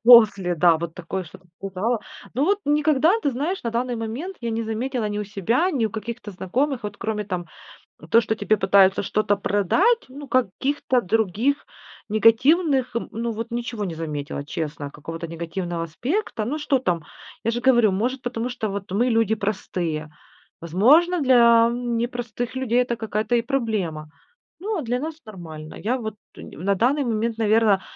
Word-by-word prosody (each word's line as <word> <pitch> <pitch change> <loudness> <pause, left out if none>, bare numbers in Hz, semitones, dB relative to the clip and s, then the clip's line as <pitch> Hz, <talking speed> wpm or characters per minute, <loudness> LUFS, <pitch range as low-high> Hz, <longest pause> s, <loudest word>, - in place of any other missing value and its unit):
после, 215 -7 +7
да, 165 -1 +5
вот 170 -1 -5
такое 180 +2 -4
что-то 180 +3 -15 0.2
показала. 195 +4 -1 0.3
Но 270 - +2
вот 400 +4 +2
никогда, 300 +2 +3
ты 285 - +2
знаешь, 300 +10 -2
на 235 - -2
данный 245 +2 -1
момент 240 - -5
я 235 - -2
не 225 0 -1
заметила 225 +1 -2
ни 205 0 -3
у 210 - -2
себя, 220 - 0
ни 255 -9 +1
у 215 - -6
каких-то 225 +1 -6
знакомых 250 +9 -1
Вот 205 -1 -5
кроме, 210 -1 -3
там, 180 -3 -4 0.6
то, 230 - +6
что 220 -1 -1
тебе 210 0 +2
пытаются 190 0 +4
что-то 205 +1 +1
продать, 270 - +2
ну, 280 +2 -10
каких-то 255 +2 +1
других 220 +6 0 0.4
негативных, 255 - +3 0.2
ну, 230 +1 -2
вот 230 +2 -5
ничего 235 -2 -3
не 170 -4 -4
заметила, 145 -3 -4
честно, 150 -2 -4
какого-то 165 +4 -7
негативного 170 +1 -4
аспекта. 235 - -2
Ну, 280 +7 -2
что 275 -2 +1
там? 175 -9 -1 0.4
Я 230 - +1
же 240 - -2
говорю, 240 -5 +5
может, 245 +7 -1
потому 245 -1 -3
что 245 -4 -3
вот 195 -1 -5
мы 225 +6 +2
люди 225 -1 +2
простые. 180 -7 -3 0.5
Возможно, 275 - +4
для 235 -3 +6
непростых 240 0 -3
людей 250 -1 +2
это 240 -1 -2
какая-то 220 +1 -1
и 235 - +3
проблема. 215 - -2 0.5
Ну 420 +2 -2
а - - -2
для 245 0 -1
нас- 315 +3 -4
нормально. 160 -7 -9
Я 240 +5 -1
вот 220 -3 -5 0.2
нь - - -11
на 195 +4 0
данный 265 +8 +2
момент, 230 0 -1
наверно, 215 -2 +3
225 Hz, 170 wpm, -23 LUFS, 195-250 Hz, 0.6 s, после